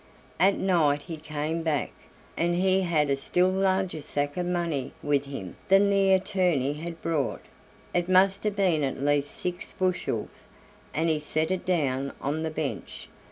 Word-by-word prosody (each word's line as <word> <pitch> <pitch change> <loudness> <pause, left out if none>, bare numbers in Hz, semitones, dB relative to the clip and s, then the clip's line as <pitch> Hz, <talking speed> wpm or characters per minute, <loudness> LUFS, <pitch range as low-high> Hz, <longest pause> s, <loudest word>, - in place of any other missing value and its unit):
At 195 +1 +4
night 155 -6 +2
he 170 - -6
came 155 +1 -3
back, 155 -4 -1 0.4
and 175 +1 +1
he 190 +1 +3
had 155 -5 +1
a - - +3
still 180 +7 +1
larger 190 -3 0
sack 145 0 -2
of 180 -1 -2
money 170 -7 -1
with 145 -1 +1
him 135 -11 -7
than 195 +1 +5
the 195 -1 +4
attorney 180 -8 +1
had 165 +2 -7
brought; 155 -6 -1 0.5
it 175 0 0
must 190 +1 +4
have 210 -1 0
been 180 -7 +2
at 135 -1 -2
least 145 +1 +1
six 180 0 -5
bushels, 185 -1 -2 0.4
and 160 +2 0
he 160 -2 +2
set 155 +3 -1
it 185 0 -2
down 140 -6 0
on 145 +3 -2
the 160 - -1
bench. 155 -3 -5
165 Hz, 165 wpm, -27 LUFS, 145-185 Hz, 0.5 s, than